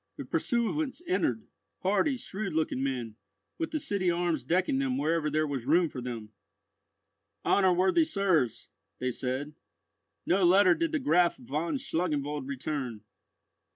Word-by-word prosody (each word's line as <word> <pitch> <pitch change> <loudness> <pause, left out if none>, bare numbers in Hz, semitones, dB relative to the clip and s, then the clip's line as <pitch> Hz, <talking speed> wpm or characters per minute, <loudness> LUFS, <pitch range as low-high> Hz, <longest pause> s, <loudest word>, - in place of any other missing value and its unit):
The - - -6
pursuivants 265 +5 -1
entered—hardy, 315 -5 -1
shrewd 200 -4 -4
looking 155 -4 0
men, 125 -5 -3 0.4
with 330 - -1
the 310 - -2
city 200 -8 0
arms 170 -5 0
decking 170 -1 +1
them 130 -1 0
wherever 155 +2 +1
there 155 +1 +1
was 135 -4 -4
room 170 +2 +4
for 130 - -6
them. 115 -4 -6 1.1
"Honour 190 -2 +4
worthy 190 - +4
sirs," 185 - +1 0.3
they 130 0 -1
said, 130 +4 -3 0.7
"no 190 +2 +2
letter 185 +1 +6
did 330 - -1
the 315 - +1
Graf 180 - +3
von 150 - -3
Schlangenwald 150 - -2
return." 135 -5 -4
165 Hz, 135 wpm, -29 LUFS, 135-195 Hz, 1.1 s, letter